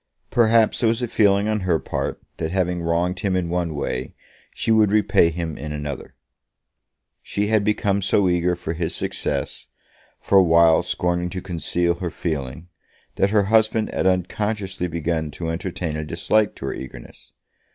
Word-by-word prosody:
Perhaps 115 Hz, -1 st, +4 dB
there 115 Hz, -, +3 dB
was 115 Hz, +2 st, -1 dB
a -, -, 0 dB
feeling 100 Hz, -2 st, +3 dB
on 110 Hz, 0 st, 0 dB
her 90 Hz, -4 st, +1 dB
part -, -, -4 dB, 0.2 s
that 80 Hz, -, -2 dB
having 90 Hz, -1 st, -1 dB
wronged 85 Hz, +2 st, 0 dB
him 95 Hz, -2 st, 0 dB
in 90 Hz, -2 st, -1 dB
one 85 Hz, -2 st, -1 dB
way, 65 Hz, -2 st, -4 dB, 0.4 s
she -, -, -2 dB
would 110 Hz, -2 st, +4 dB
repay 105 Hz, -5 st, +4 dB
him 85 Hz, -2 st, -4 dB
in 75 Hz, +1 st, -5 dB
another. 75 Hz, -2 st, -6 dB, 1.1 s
She 105 Hz, +1 st, -2 dB
had 110 Hz, -2 st, +3 dB
become 100 Hz, -1 st, +1 dB
so 100 Hz, 0 st, +2 dB
eager 90 Hz, 0 st, +1 dB
for 85 Hz, -1 st, -5 dB
his 85 Hz, 0 st, -2 dB
success, -, -, -2 dB, 0.5 s
for 100 Hz, -, +4 dB
a -, -, +6 dB
while 85 Hz, -1 st, +5 dB
scorning 90 Hz, 0 st, -1 dB
to 95 Hz, -, -5 dB
conceal 85 Hz, -1 st, -1 dB
her 90 Hz, -, -2 dB
feeling, 80 Hz, -1 st, -4 dB, 0.5 s
that 95 Hz, -, +3 dB
her 105 Hz, 0 st, +3 dB
husband 110 Hz, +1 st, +2 dB
had -, -, +1 dB
unconsciously 95 Hz, +1 st, -1 dB
begun 80 Hz, -1 st, -2 dB
to 80 Hz, +3 st, -5 dB
entertain 85 Hz, -1 st, -4 dB
a 75 Hz, -, -3 dB
dislike 100 Hz, +7 st, +1 dB
to -, -, -7 dB
her -, -, -2 dB
eagerness. -, -, -11 dB
90 Hz, 170 wpm, -22 LUFS, 85-100 Hz, 1.1 s, a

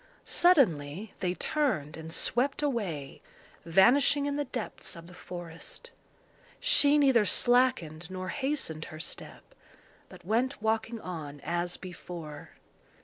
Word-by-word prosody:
Suddenly 205 Hz, -, +3 dB
they 180 Hz, -1 st, -1 dB
turned 215 Hz, -, 0 dB
and 160 Hz, 0 st, -8 dB
swept 260 Hz, -, +1 dB
away, 190 Hz, -, -3 dB, 0.4 s
vanishing 255 Hz, -, +4 dB
in 285 Hz, 0 st, -1 dB
the 290 Hz, 0 st, -1 dB
depths 240 Hz, -6 st, -5 dB
of 165 Hz, 0 st, -11 dB
the 180 Hz, -, -13 dB
forest. 175 Hz, -, -9 dB, 0.7 s
She 300 Hz, -12 st, +5 dB
neither 265 Hz, -6 st, +5 dB
slackened 205 Hz, -10 st, +2 dB
nor 185 Hz, 0 st, -5 dB
hastened 270 Hz, -, -2 dB
her 155 Hz, -, -10 dB
step, 160 Hz, -, -7 dB, 0.7 s
but -, -, -14 dB
went 240 Hz, +7 st, 0 dB
walking 220 Hz, +1 st, -1 dB
on 150 Hz, -5 st, -7 dB
as 175 Hz, +3 st, -2 dB
before. 170 Hz, -4 st, -9 dB
190 Hz, 120 wpm, -29 LUFS, 165-265 Hz, 0.7 s, She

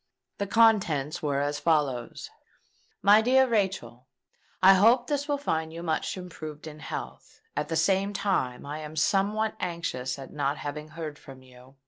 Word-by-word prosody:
Its 200 Hz, -1 st, -3 dB
contents 195 Hz, -11 st, +3 dB
were 140 Hz, -2 st, 0 dB
as 145 Hz, +1 st, -1 dB
follow:— 145 Hz, -6 st, +1 dB, 0.9 s
"MY 205 Hz, +2 st, +7 dB
DEAR 260 Hz, +3 st, +4 dB
RACHEL, 190 Hz, -, -2 dB, 0.6 s
"I 190 Hz, +1 st, +9 dB
hope 230 Hz, +6 st, +5 dB
this 285 Hz, +1 st, -2 dB
will 290 Hz, -1 st, 0 dB
find 160 Hz, -, -2 dB
you 165 Hz, +1 st, -7 dB
much 160 Hz, +2 st, -2 dB
improved 155 Hz, -4 st, -8 dB
in 155 Hz, -1 st, -9 dB
health: 65 Hz, -, -8 dB, 0.2 s
at 150 Hz, -, -2 dB
the 165 Hz, -, -2 dB
same 195 Hz, +4 st, +2 dB
time 190 Hz, -13 st, -1 dB
I 145 Hz, +2 st, -5 dB
am 155 Hz, 0 st, -8 dB
somewhat 205 Hz, +7 st, +1 dB
anxious 155 Hz, -8 st, -3 dB
at 135 Hz, -1 st, -10 dB
not 145 Hz, 0 st, -1 dB
having 150 Hz, +1 st, -6 dB
heard 155 Hz, -2 st, -7 dB
from 130 Hz, -1 st, -13 dB
you. 130 Hz, +1 st, -17 dB
160 Hz, 160 wpm, -27 LUFS, 145-200 Hz, 0.9 s, I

